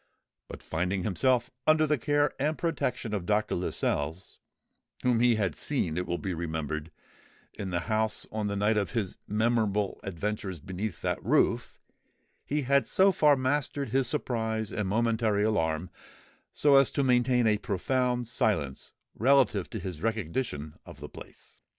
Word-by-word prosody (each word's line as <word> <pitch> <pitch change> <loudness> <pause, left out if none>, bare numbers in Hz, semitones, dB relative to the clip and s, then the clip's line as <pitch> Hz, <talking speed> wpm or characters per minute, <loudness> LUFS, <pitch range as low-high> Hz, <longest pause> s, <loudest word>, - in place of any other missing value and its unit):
But - - -10
finding 90 +3 -1
himself 120 +5 +1 0.2
under 155 0 +5
the 150 -3 +1
care 145 +2 +1
and 150 +3 0
protection 125 -9 -2
of 95 -4 -3
Dr. 105 0 +1
Lascelles, 85 -1 -2 0.6
whom 125 -2 +3
he 120 -1 +4
had 100 -6 0
seen, 80 - -1
it 90 +1 -2
will 85 - -1
be 95 0 -3
remembered, 80 -2 -3 0.6
in 100 - -5
the 85 -1 -1
house 110 +2 -1
on 110 -1 -2
the 100 - -2
night 105 +2 +2
of 100 -4 -1
his 105 -5 -2
memorable 105 -2 +1
adventures 100 -1 -4
beneath 95 +7 -5
that - - -1
roof, - - +1 0.7
he 150 0 0
had 140 +2 +2
so 195 +1 +4
far 150 -5 +4
mastered 140 0 -1
his 130 +2 +2
surprise 110 -3 -2
and 105 -2 -1
momentary 110 0 +1
alarm, 80 -5 0 0.7
as 140 -2 +7
to 140 - 0
maintain 125 -1 +3
a 105 -1 +3
profound 125 +4 0
silence 80 - -1 0.2
relative 115 -6 +3
to - - -5
his 90 -5 -6
recognition 100 - -2
of - - -12
the - - -8
place. - - -13
110 Hz, 150 wpm, -29 LUFS, 95-125 Hz, 0.7 s, as